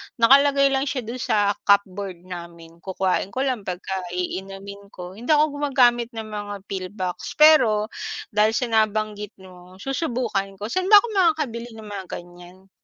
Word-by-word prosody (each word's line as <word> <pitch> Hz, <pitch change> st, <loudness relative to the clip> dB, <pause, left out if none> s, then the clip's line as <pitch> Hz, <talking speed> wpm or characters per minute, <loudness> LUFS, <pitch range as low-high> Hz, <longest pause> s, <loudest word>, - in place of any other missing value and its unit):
nakalagay 275 Hz, +3 st, +5 dB
lang 270 Hz, +1 st, 0 dB
siya 255 Hz, -3 st, -2 dB
do'n 235 Hz, +3 st, -6 dB
sa 205 Hz, -3 st, +2 dB, 0.2 s
cupboard 195 Hz, -3 st, +1 dB
namin. 170 Hz, -2 st, -10 dB
Kukuhain 190 Hz, 0 st, -1 dB
ko 255 Hz, +7 st, -3 dB
lang 250 Hz, -8 st, -2 dB
pag 180 Hz, +1 st, -4 dB
ka 190 Hz, -1 st, -4 dB
iinumin 195 Hz, +2 st, -6 dB
ko, 185 Hz, +1 st, -10 dB
hindi 240 Hz, -, -9 dB
ako 300 Hz, 0 st, +3 dB
gumagamit 245 Hz, -4 st, +2 dB
ng 220 Hz, -1 st, -6 dB
mga 205 Hz, -1 st, -5 dB
pill 190 Hz, -2 st, -5 dB
box. 185 Hz, -3 st, -4 dB
Pero, 230 Hz, -9 st, +5 dB, 0.4 s
dahil 215 Hz, +2 st, +2 dB
sa 250 Hz, -4 st, -1 dB
nabanggit 215 Hz, -1 st, 0 dB
mo, 180 Hz, 0 st, -15 dB
susubukan 250 Hz, -8 st, -2 dB
ko. 210 Hz, +3 st, -6 dB
Saan 370 Hz, +4 st, -1 dB
ba 420 Hz, -, +8 dB
ako -, -, -3 dB
makakabili 300 Hz, -, 0 dB
ng 220 Hz, -, -10 dB
mga 205 Hz, -3 st, -7 dB
ganyan? 175 Hz, +2 st, -11 dB
210 Hz, 165 wpm, -23 LUFS, 190-250 Hz, 0.4 s, ba